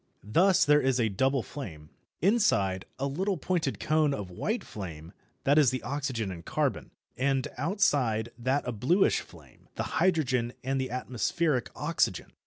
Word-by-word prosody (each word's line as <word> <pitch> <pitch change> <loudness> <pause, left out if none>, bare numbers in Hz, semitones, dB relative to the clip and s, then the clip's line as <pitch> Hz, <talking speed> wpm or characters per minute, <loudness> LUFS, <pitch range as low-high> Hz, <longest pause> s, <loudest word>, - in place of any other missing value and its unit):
Thus 180 - +4
there 150 0 +5
is 130 -1 +1
a 115 -2 +2
double 130 +5 +1
flame: 80 - -8 0.3
inside, 170 - +2
a 135 - -2
little 185 +8 -1
pointed 160 -3 -1
cone 155 -2 +2
of 95 -3 -6
white 215 - -2
flame, 85 -4 -8 0.3
that 145 +3 +4
is 145 -5 +5
the 130 +1 -3
oxygen 130 -7 -2
and 85 -2 -8
carbon; - - -1 0.3
and 135 0 +1
outside 140 - +1
that 130 +3 -1
a - - 0
bluish 135 - +2
flame, - - -15
the - - -2
hydrogen 130 -9 +2
and 135 +1 0
the 130 - -3
atmospheric 125 +2 -1
oxygen. 150 - -1
130 Hz, 155 wpm, -29 LUFS, 115-155 Hz, 0.3 s, there